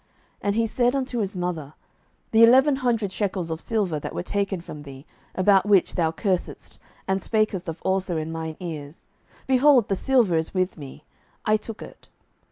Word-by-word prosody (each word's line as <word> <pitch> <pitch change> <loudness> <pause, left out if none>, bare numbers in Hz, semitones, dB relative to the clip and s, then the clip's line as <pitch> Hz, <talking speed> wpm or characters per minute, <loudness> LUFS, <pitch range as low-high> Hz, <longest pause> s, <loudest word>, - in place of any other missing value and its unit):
07:017:002 - - -40 0.3
And 200 0 0
he 230 0 +2
said 245 +3 +1
unto 260 -3 -2
his 200 -2 -3
mother, 165 -5 -4 0.6
The 225 0 +6
eleven 265 +4 +6
hundred 230 -6 0
shekels 190 -4 -2
of 160 0 -4
silver 195 -9 -1
that - - -7
were - - -3
taken 200 0 -2
from 155 -3 -9
thee, 140 -1 -11 0.3
about 195 +1 +4
which 200 -3 +4
thou 165 -3 +1
cursedst, 185 +1 -3 0.3
and 190 0 0
spakest 215 -4 0
of 165 - -7
also 190 -2 0
in 160 +1 -3
mine 160 -1 -5
ears, 155 -3 -7 0.4
behold, 265 -2 +4
the 195 - +1
silver 230 -6 +2
is 160 +4 -1
with 185 0 0
me; 145 -1 -11 0.4
I 215 - +4
took 220 0 -6
it. - - -14
190 Hz, 180 wpm, -24 LUFS, 165-225 Hz, 0.6 s, The